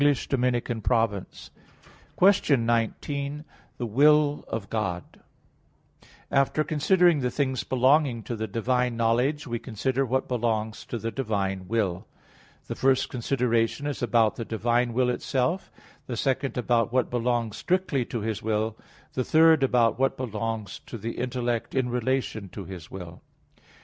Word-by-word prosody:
_______________________ 120 -6 0 0.7
QUESTION 155 - +4
19 140 +6 -1 0.3
THE 120 - -3
WILL 145 +5 +4
OF 110 -3 -4
GOD 90 -6 -1
(In - - -27
Twelve - - -24
Articles) - - -32 0.2
After 140 +2 +2
considering 165 +2 +3
the 125 -2 0
things 130 -2 -1
belonging 130 -2 +2
to 120 - -4
the 110 0 -3
divine 125 +3 0
knowledge, 125 +6 +1
we 120 -3 -3
consider 130 +3 -1
what 130 +1 -1
belongs 110 -2 -1
to 120 - -4
the 115 0 -3
divine 100 -7 -2
will. 100 -5 -1 0.6
The - - -4
first 135 0 +2
consideration 120 +1 0
is 145 -3 -3
about 115 -3 +2
the 115 - -3
divine 120 +2 0
will 125 +1 +2
itself; 135 +9 -1 0.4
the 120 - -4
second 135 +1 -1
about 120 -2 +1
what 125 0 +1
belongs 120 -2 -1
strictly 180 -8 0
to 115 - -4
His 110 -1 -3
will; 110 0 -1 0.4
the 130 - 0
third 160 +2 +5
about 120 -4 +3
what 135 0 +1
belongs 115 -3 -4
to 115 - -6
the 115 +2 -4
intellect 120 -1 -2
in 130 -2 +1
relation 125 -4 -1
to 100 - -7
His 90 -3 -9
will. 90 -3 -9
120 Hz, 145 wpm, -26 LUFS, 115-135 Hz, 0.7 s, third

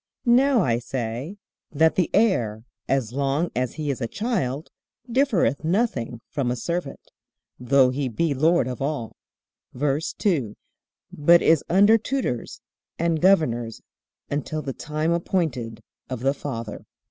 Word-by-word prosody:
Now 250 -1 +4
I 120 -6 +1
say, 125 - -4 0.3
That 160 +2 +3
the 180 - +1
heir, 120 - +1 0.3
as 130 -4 0
long 140 +5 0
as 125 0 -1
he 150 -2 -2
is 135 - -5
a 115 - -1
child, 165 - -2 0.4
differeth 225 - +2
nothing 155 - -1
from 140 -4 -1
a 125 - 0
servant, 170 +2 -4 0.5
though 130 +1 +4
he 135 0 -2
be 145 +7 0
Lord 155 0 +3
of 125 0 -5
all; 140 -5 -3 0.6
VERSE 145 +4 -1
2. 140 - 0 0.6
But 170 +4 +5
is 160 -2 +4
under 205 +5 +5
tutors 230 - -3 0.4
and 165 -1 0
governors 120 - +2 0.5
until 150 +2 -3
the 135 - -4
time 155 +4 -2
appointed 145 - -1 0.3
of 130 -3 -4
the 135 +2 +2
father. 115 -7 -6
145 Hz, 135 wpm, -24 LUFS, 125-170 Hz, 0.6 s, But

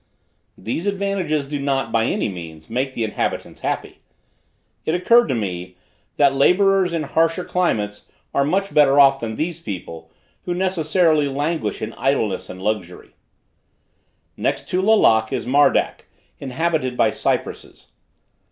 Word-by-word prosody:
These 155 - -4
advantages 195 -7 -1
do 145 0 -4
not, 135 -1 -1
by 115 0 +2
any - - 0
means, 85 -3 -9
make 130 +3 -2
the 115 - -1
inhabitants 110 - -3
happy. - - -4 0.8
It 160 - 0
occurred 235 +7 +4
to 135 - -1
me, 90 -4 -4 0.4
that 140 -2 +4
laborers 185 +6 +3
in 165 -2 -1
harsher 165 +4 0
climates 105 - -1 0.3
are 140 - +2
much 195 +7 -1
better 145 -1 +5
off 135 -1 +6
than 110 -3 -4
these 170 +5 -3
people, 85 - -7 0.4
who 175 - -2
necessarily 165 -4 +2
languish 145 -5 -2
in 110 +1 -5
idleness 110 -9 -1
and 90 - -8
luxury. 95 -3 -4 1.2
Next - - -2
to 185 - 0
Lalak 115 - +4
is - - -2
Mardak, 140 +4 +2 0.3
inhabited 135 -1 -2
by 110 - +3
cypresses. - - -3
140 Hz, 135 wpm, -21 LUFS, 110-170 Hz, 1.2 s, off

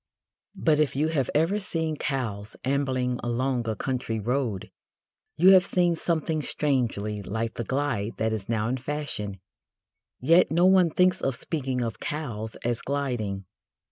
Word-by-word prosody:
But, 150 -1 +2
if 150 -3 +1
you 150 +3 +1
have 140 -6 0
ever 165 +7 +2
seen 160 -5 -1
cows 115 -9 -3
ambling 130 -2 0
along 120 0 -1
a 110 - -1
country 120 -1 -2
road 120 -3 -2 0.7
you 180 +4 +7
have 185 -2 +8
seen 175 -3 +2
something 160 -1 -1
strangely 115 -9 -1
like 110 +3 -3
the 120 - -4
glide 125 -5 -1
that 110 0 0
is 110 -1 -5
now 110 -2 0
in 130 +2 0
fashion, 130 -7 -4 0.8
yet 165 +7 +5
no 170 +3 +3
one 185 -2 +6
thinks 180 +3 +2
of 135 - 0
speaking 130 -3 -2
of 115 -2 -3
cows 115 -8 -4
as 120 -1 0
"gliding." 120 -9 -2
130 Hz, 150 wpm, -26 LUFS, 115-155 Hz, 0.8 s, have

